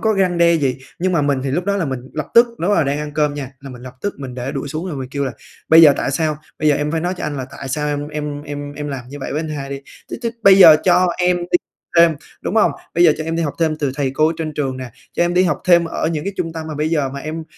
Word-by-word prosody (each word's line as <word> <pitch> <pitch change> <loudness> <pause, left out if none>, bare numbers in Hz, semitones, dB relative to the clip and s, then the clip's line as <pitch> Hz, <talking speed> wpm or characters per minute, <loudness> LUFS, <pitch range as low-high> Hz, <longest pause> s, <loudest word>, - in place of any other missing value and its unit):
có 220 -1 +2
răng 185 -3 +1
đe 170 0 +5
gì, 135 -5 0 0.2
nhưng 185 +1 0
mà 165 - +2
mình 140 -2 +1
thì 135 - -1
lúc 175 +6 -1
đó 200 0 0
là 185 - 0
mình 130 -3 -3
lập 150 -2 -4
tức 235 +1 +8
lúc 235 - -19
đó 190 +5 +1
là 160 - +3
đang 140 +2 -1
ăn 150 -1 -5
cơm 150 -1 0
nha, 135 -2 -6
là 135 -1 -9
mình 125 -1 -11
lập 125 -1 -10
tức 205 - -2
mình 130 -3 -7
để 130 +2 -4
đũa 140 -1 -4
xuống 155 +5 -4
rồi 155 - -5
mình 130 -1 -5
kêu 140 +1 -2
là 130 - -3 0.4
"Bây 165 +1 +8
giờ 150 -3 +9
tại - - -1
sao? 155 +2 0 0.2
Bây 155 - +2
giờ 150 - +4
em 150 0 -2
phải 165 - 0
nói 175 +2 -1
cho - - -5
anh 150 -1 -3
là 130 -2 -4
tại 135 - -6
sao 150 +3 -1
em 145 0 -3
em 150 -1 -5
em 145 -1 -6
em 150 0 -6
làm 130 -3 -6
như 145 +2 -8
vậy - - -4
với 150 - -1
anh 160 - -5
hai 140 -2 -5
đi. 140 - -5 0.3
Chứ - - -4
chứ 230 - -1
bây 195 -1 +7
giờ 160 -5 +10
cho 185 0 +4
em 180 0 +2
đi 175 0 +1 0.4
thêm, 170 -1 +7 0.3
đúng 200 - -3
hông? 215 - +5 0.2
Bây 175 - +4
giờ 155 - +7
cho 155 - -4
em 165 +1 -2
đi 170 - 0
học 145 - -2
thêm 160 -2 +1
từ 140 -4 -2
thầy 135 -2 -1
cô 155 +4 +2
trên 155 -1 -3
trường 135 -3 -2
nè, 130 -2 -7 0.2
cho - - +1
em 175 +1 -1
đi 180 - +5
học 175 - 0
thêm 170 -2 +5
ở 165 - -2
những 160 -2 -3
cái 200 - -3
trung 165 -2 -3
tâm 160 -1 -6
mà 155 - -5
bây 150 +2 -1
giờ 150 -5 +1
mà 140 +1 -7
em 160 +1 -5
150 Hz, 330 wpm, -19 LUFS, 140-170 Hz, 0.4 s, giờ